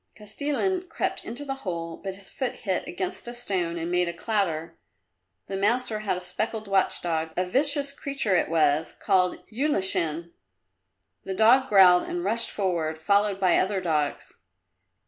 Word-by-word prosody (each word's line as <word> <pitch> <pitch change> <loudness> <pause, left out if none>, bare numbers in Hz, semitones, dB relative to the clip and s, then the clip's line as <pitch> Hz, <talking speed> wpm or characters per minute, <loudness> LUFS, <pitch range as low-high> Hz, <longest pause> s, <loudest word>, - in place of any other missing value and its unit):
Kostilin 295 - -2
crept - - -2
into 240 +6 -6
the 270 - -2
hole, 170 -3 -4
but 195 +1 -6
his 195 0 -10
foot 260 -2 -2
hit 190 -3 -1
against 360 -6 -4
a 240 - -6
stone 185 -8 -2
and 170 +1 -3
made 180 -1 +1
a - - -4
clatter. 170 -5 -2 0.7
The 195 - -5
master 220 +3 +1
had 200 -4 -1
a - - -5
speckled 215 +3 -3
watch 195 -1 +2
dog 160 -2 -1
a 180 - +1
vicious 280 +7 +2
creature 275 -8 -1
it - - +1
was, 155 -1 +1
called 185 -3 +2
Ulashin. 190 - -1 0.9
The 190 - -4
dog 245 +6 +5
growled 185 -3 +7
and 175 0 -3
rushed 230 +4 +1
forward, 170 -6 -1
followed 200 +4 +1
by 185 -3 +3
other 195 +1 0
dogs. 155 -5 -2
195 Hz, 160 wpm, -26 LUFS, 175-230 Hz, 0.9 s, growled